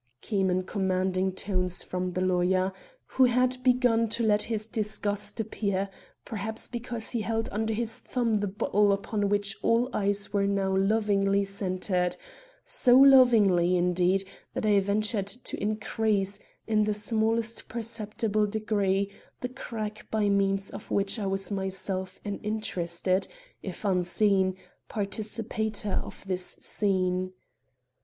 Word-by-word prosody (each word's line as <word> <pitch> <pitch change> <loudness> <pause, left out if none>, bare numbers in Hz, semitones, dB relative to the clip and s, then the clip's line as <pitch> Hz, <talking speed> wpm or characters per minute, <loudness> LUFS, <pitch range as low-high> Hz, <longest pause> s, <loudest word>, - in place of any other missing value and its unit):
came 195 -4 0
in 185 0 +1
commanding 190 -1 0
tones 185 -2 -1
from 180 0 -3
the 185 - -1
lawyer, 185 +1 +2 0.3
who 260 - +3
had 250 +1 +2
begun 245 -2 +3
to 230 +2 -1
let 210 -1 +3
his 215 -1 -2
disgust 210 -1 -2
appear, 200 -3 -2 0.3
perhaps 220 0 -3
because 240 -2 -4
he 235 - -1
held 225 +1 -1
under 220 +2 -1
his 225 +2 -1
thumb 240 -3 -1
the 205 -1 +1
bottle 205 +1 +2
upon 200 +1 -1
which 205 -1 +2
all 240 +3 +2
eyes 200 0 -1
were 200 -1 +2
now 195 -1 +1
lovingly 200 0 +2
centered; 185 -2 -1 0.5
so 375 - +4
lovingly, 225 -10 +6
indeed, 180 +2 +2 0.3
that - - -1
I 205 -1 +5
ventured 200 +1 0
to 200 +6 -4
increase, 210 -1 0 0.3
in 215 -1 +2
the 210 0 0
smallest 225 +2 0
perceptible 215 -2 -1
degree, 200 -2 0 0.3
the 250 - -3
crack 215 -4 -6
by 215 -2 +1
means 195 0 +1
of - - -9
which 200 +3 +1
I 200 - -2
was 195 +1 -2
myself 190 -1 -3
an 205 -1 -3
interested, 185 -3 -1 0.3
if 190 +2 -7
unseen, 190 0 +2 0.3
participator 215 0 -2
in - - -8
this 185 -1 -2
scene. 185 -2 0
205 Hz, 135 wpm, -28 LUFS, 190-220 Hz, 0.5 s, lovingly